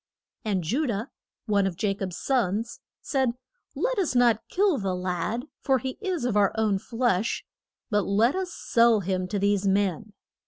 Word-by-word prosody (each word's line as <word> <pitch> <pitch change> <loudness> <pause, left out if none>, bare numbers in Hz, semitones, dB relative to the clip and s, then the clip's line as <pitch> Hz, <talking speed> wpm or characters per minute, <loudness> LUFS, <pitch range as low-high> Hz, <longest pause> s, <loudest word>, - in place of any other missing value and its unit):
] - - -59
And 195 -5 0
Ju 265 - 0
dah 220 -1 -1 0.4
one 200 -3 +2
of 185 - -3
Ja 200 -2 +2
cob's 190 -3 -5
sons 230 -3 0 0.2
said, 265 -4 +1 0.4
Let - - 0
us 345 -9 0
not 240 -3 +4
kill 380 -5 +2
the 190 -2 -1
lad, 180 +7 -2 0.2
for 270 -1 +3
he 260 +1 -5
is 365 - -2
of 240 -4 0
our 205 -2 +4
own 215 -3 +1
flesh, 230 -2 0 0.5
but 205 -2 +1
let 220 - +3
us 375 -2 -2
sell 230 -7 +3
him 185 0 -1
to 205 - -2
these 200 0 +1
men. 200 +1 0
215 Hz, 180 wpm, -26 LUFS, 195-250 Hz, 0.5 s, not